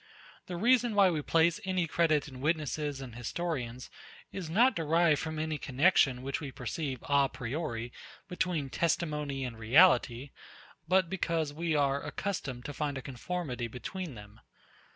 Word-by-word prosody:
The 180 Hz, -, -4 dB
reason 240 Hz, +2 st, +3 dB
why 195 Hz, -3 st, +6 dB
we 155 Hz, -3 st, -1 dB
place 165 Hz, +4 st, +2 dB
any 185 Hz, -2 st, 0 dB
credit 155 Hz, -3 st, +2 dB
in 130 Hz, -3 st, -10 dB
witnesses 150 Hz, -2 st, -1 dB
and 130 Hz, -3 st, -8 dB
historians, 125 Hz, -1 st, -4 dB, 0.4 s
is 185 Hz, -5 st, -5 dB
not 235 Hz, +8 st, +4 dB
derived 165 Hz, -1 st, +3 dB
from 155 Hz, -1 st, -4 dB
any 155 Hz, -1 st, -2 dB
connexion, 135 Hz, -2 st, +3 dB
which 135 Hz, +3 st, -3 dB
we 140 Hz, -3 st, -5 dB
perceive 130 Hz, +1 st, -4 dB
a 140 Hz, -1 st, +3 dB
priori, 125 Hz, -2 st, -4 dB, 0.3 s
between 170 Hz, -6 st, -2 dB
testimony 150 Hz, -5 st, -1 dB
and 115 Hz, -3 st, -7 dB
reality, 125 Hz, 0 st, +4 dB, 0.6 s
but 185 Hz, 0 st, +3 dB
because 165 Hz, -4 st, -1 dB
we 165 Hz, +1 st, -1 dB
are 140 Hz, -1 st, +2 dB
accustomed 145 Hz, -6 st, -4 dB
to 145 Hz, -, -5 dB
find 145 Hz, -1 st, -2 dB
a 135 Hz, -, -6 dB
conformity 130 Hz, -2 st, -4 dB
between 150 Hz, -, -6 dB
them. 105 Hz, 0 st, -13 dB
150 Hz, 150 wpm, -31 LUFS, 130-170 Hz, 0.6 s, why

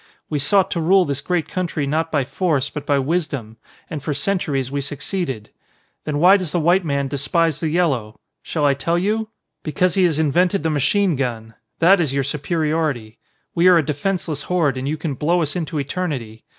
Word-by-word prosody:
We 150 Hz, -, 0 dB
sought 195 Hz, +6 st, +3 dB
to 170 Hz, -, -1 dB
rule 185 Hz, +3 st, +4 dB
this 140 Hz, -1 st, -3 dB
great 175 Hz, +1 st, -1 dB
country 170 Hz, -5 st, -2 dB
not 160 Hz, +3 st, -1 dB
by 145 Hz, -3 st, +1 dB
force, 145 Hz, -1 st, 0 dB
but 150 Hz, -1 st, -7 dB
by 145 Hz, -, +3 dB
wisdom. 140 Hz, -6 st, -2 dB, 0.3 s
And 150 Hz, -, -5 dB
for 150 Hz, +1 st, -3 dB
centuries 145 Hz, -6 st, -1 dB
we 140 Hz, 0 st, -1 dB
succeeded. 140 Hz, -, -4 dB, 0.5 s
Then 150 Hz, -1 st, -1 dB
why 180 Hz, +6 st, +6 dB
does 180 Hz, -6 st, -3 dB
the 175 Hz, -, +1 dB
white 175 Hz, +4 st, +3 dB
man 140 Hz, -3 st, -1 dB
despise 150 Hz, +3 st, 0 dB
the 160 Hz, -, -1 dB
yellow? 140 Hz, -11 st, 0 dB, 0.2 s
Shall 150 Hz, -3 st, -1 dB
I 140 Hz, -, +4 dB
tell 155 Hz, +5 st, 0 dB
you? 215 Hz, +4 st, 0 dB, 0.3 s
Because 175 Hz, +4 st, 0 dB
he 190 Hz, -2 st, +3 dB
has 160 Hz, -4 st, +1 dB
invented 170 Hz, +4 st, +2 dB
the 160 Hz, -, +1 dB
machine 175 Hz, +5 st, +2 dB
gun. 115 Hz, -4 st, -3 dB, 0.2 s
That 175 Hz, +2 st, +5 dB
is 140 Hz, -5 st, -1 dB
your 140 Hz, -, +1 dB
superiority. 150 Hz, -5 st, -2 dB, 0.3 s
We 170 Hz, +1 st, +3 dB
are 180 Hz, -1 st, +7 dB
a 160 Hz, -, +2 dB
defenceless 155 Hz, 0 st, -2 dB
horde 165 Hz, -7 st, +2 dB
and 130 Hz, +1 st, -4 dB
you 155 Hz, +2 st, -1 dB
can 155 Hz, -1 st, -3 dB
blow 170 Hz, +6 st, +1 dB
us 150 Hz, -, -3 dB
into 160 Hz, -3 st, -3 dB
eternity. 140 Hz, -7 st, -4 dB
155 Hz, 195 wpm, -21 LUFS, 140-175 Hz, 0.5 s, are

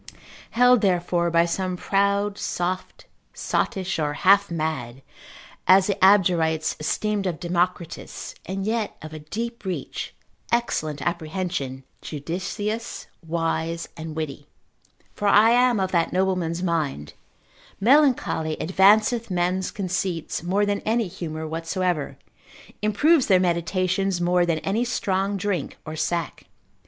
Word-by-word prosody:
held 245 Hz, 0 st, +5 dB
therefore 175 Hz, -2 st, +1 dB
by 170 Hz, 0 st, +3 dB
some 185 Hz, +1 st, -2 dB
proud, 200 Hz, +2 st, +1 dB
soft, 185 Hz, -1 st, -3 dB, 0.3 s
sottish, 190 Hz, -3 st, -1 dB
or 150 Hz, -1 st, 0 dB
half 200 Hz, +5 st, +4 dB
mad, 135 Hz, -6 st, -3 dB, 0.6 s
as 190 Hz, 0 st, +7 dB
the 200 Hz, -, +1 dB
Abderites 170 Hz, -5 st, +4 dB
esteemed 205 Hz, +6 st, -1 dB
of 170 Hz, -4 st, -3 dB
Democritus: 175 Hz, -1 st, -2 dB
and 190 Hz, +1 st, -3 dB
yet 220 Hz, -1 st, -2 dB
of 155 Hz, 0 st, -8 dB
a 155 Hz, -, -6 dB
deep 230 Hz, +10 st, -5 dB
reach, 190 Hz, -2 st, -5 dB, 0.4 s
excellent 155 Hz, -11 st, -1 dB
apprehension, 160 Hz, -6 st, -3 dB, 0.2 s
judicious, 190 Hz, +9 st, -4 dB, 0.2 s
wise, 165 Hz, 0 st, -2 dB
and 160 Hz, -1 st, -7 dB
witty: 145 Hz, -2 st, -5 dB, 0.7 s
for 205 Hz, -, -2 dB
I 210 Hz, +3 st, +6 dB
am 245 Hz, -2 st, +4 dB
of 190 Hz, -1 st, -1 dB
that 170 Hz, -2 st, +1 dB
nobleman's 180 Hz, -2 st, 0 dB
mind, 150 Hz, -, -2 dB, 0.7 s
Melancholy 240 Hz, -, +3 dB
advanceth 215 Hz, +6 st, +3 dB
men's 180 Hz, +1 st, 0 dB
conceits, 180 Hz, -4 st, -3 dB
more 190 Hz, +5 st, +1 dB
than 205 Hz, 0 st, 0 dB
any 225 Hz, -1 st, 0 dB
humour 160 Hz, -2 st, -6 dB
whatsoever, 165 Hz, 0 st, -2 dB, 0.6 s
improves 260 Hz, +9 st, +3 dB
their 190 Hz, -3 st, +5 dB
meditations 185 Hz, +2 st, 0 dB
more 175 Hz, 0 st, +2 dB
than 165 Hz, -2 st, +1 dB
any 210 Hz, +5 st, +1 dB
strong 200 Hz, -4 st, -1 dB
drink 185 Hz, -5 st, -2 dB
or 155 Hz, -, -6 dB
sack. 165 Hz, +1 st, -2 dB
180 Hz, 120 wpm, -24 LUFS, 165-200 Hz, 0.7 s, as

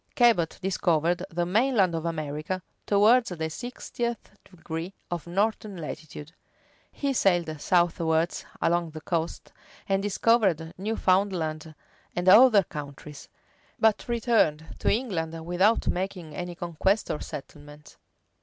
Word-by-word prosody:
Cabot 225 Hz, -10 st, +3 dB
discovered 175 Hz, -2 st, +1 dB
the 175 Hz, -1 st, -1 dB
main 235 Hz, +9 st, +2 dB
land 190 Hz, -5 st, +3 dB
of 165 Hz, 0 st, -3 dB
America 155 Hz, +3 st, -3 dB, 0.2 s
towards 220 Hz, +4 st, +4 dB
the 160 Hz, -3 st, -4 dB
sixtieth 240 Hz, +4 st, -5 dB, 0.2 s
degree 170 Hz, 0 st, -6 dB, 0.2 s
of 175 Hz, -1 st, -4 dB
northern 205 Hz, +2 st, -1 dB
latitude: 155 Hz, -1 st, -8 dB, 0.6 s
he 280 Hz, -1 st, -2 dB
sailed 175 Hz, -, +1 dB
southwards 170 Hz, -1 st, +1 dB, 0.2 s
along 170 Hz, 0 st, +1 dB
the 155 Hz, 0 st, -9 dB
coast, 165 Hz, 0 st, -3 dB, 0.3 s
and 195 Hz, 0 st, +1 dB
discovered 195 Hz, -5 st, +2 dB
Newfoundland 185 Hz, -6 st, 0 dB, 0.4 s
and 175 Hz, +1 st, -2 dB
other 215 Hz, +1 st, +8 dB
countries; 145 Hz, -2 st, -9 dB, 0.5 s
but 220 Hz, -1 st, +2 dB
returned 225 Hz, -10 st, +1 dB
to -, -, +1 dB
England 165 Hz, -9 st, -2 dB
without 185 Hz, +6 st, +2 dB
making 180 Hz, -4 st, -3 dB
any 175 Hz, -1 st, -5 dB
conquest 175 Hz, +5 st, 0 dB
or 150 Hz, -, -3 dB
settlement. 145 Hz, 0 st, -10 dB
175 Hz, 115 wpm, -27 LUFS, 160-205 Hz, 0.6 s, other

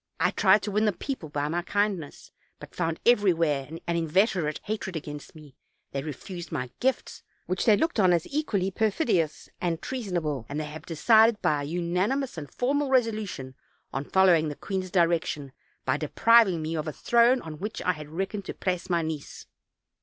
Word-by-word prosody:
I -, -, +3 dB
tried 195 Hz, +1 st, +4 dB
to 210 Hz, -, -3 dB
win 210 Hz, +2 st, +2 dB
the 210 Hz, -, +2 dB
people 215 Hz, -, -5 dB
by 145 Hz, 0 st, -2 dB
my 170 Hz, +3 st, -1 dB
kind 205 Hz, +1 st, 0 dB
ness, 145 Hz, -3 st, -11 dB, 0.3 s
but -, -, -12 dB
found 165 Hz, -2 st, -2 dB
everywhere 165 Hz, -, +3 dB
an 165 Hz, +1 st, -8 dB, 0.2 s
inveterate 170 Hz, -1 st, +1 dB
hatred 205 Hz, -4 st, -4 dB
against 150 Hz, -1 st, -7 dB
me; 150 Hz, -4 st, -14 dB, 0.4 s
they 135 Hz, -, -2 dB
refused 170 Hz, +5 st, -7 dB
my 130 Hz, -6 st, -3 dB
gifts, 260 Hz, 0 st, -1 dB, 0.2 s
which 185 Hz, 0 st, -1 dB
they 215 Hz, -3 st, +6 dB
looked 320 Hz, -4 st, 0 dB
on 185 Hz, -3 st, +5 dB
as 170 Hz, -2 st, +2 dB
equally 210 Hz, -11 st, 0 dB
perfidious 190 Hz, -, 0 dB
and 170 Hz, -2 st, -1 dB
treasonable, 175 Hz, -, -3 dB
and 145 Hz, +2 st, -3 dB
they -, -, -2 dB
have 150 Hz, +1 st, -9 dB
decided 220 Hz, +6 st, +4 dB
by 150 Hz, -1 st, +2 dB
a -, -, -4 dB
unanimous 180 Hz, -, -1 dB
and 150 Hz, -4 st, -7 dB
formal 280 Hz, +3 st, 0 dB
resolution 215 Hz, -, 0 dB, 0.4 s
on 135 Hz, -, -2 dB
following 175 Hz, -4 st, +4 dB
the 145 Hz, -, -5 dB
queen's 190 Hz, +2 st, -4 dB
direction, 165 Hz, -5 st, +1 dB, 0.3 s
by -, -, +1 dB
depriving 225 Hz, -8 st, +4 dB
me 160 Hz, +1 st, -3 dB
of 155 Hz, 0 st, -3 dB
a 155 Hz, -, -3 dB
throne 240 Hz, -, +4 dB
on 155 Hz, -2 st, -8 dB
which 210 Hz, +3 st, -4 dB
I 180 Hz, -, +3 dB
had 155 Hz, -4 st, -8 dB
reckoned 195 Hz, +4 st, -4 dB
to -, -, -6 dB
place 185 Hz, 0 st, -2 dB
my 170 Hz, -2 st, +1 dB
niece. 155 Hz, -2 st, -6 dB
180 Hz, 185 wpm, -27 LUFS, 155-210 Hz, 0.4 s, they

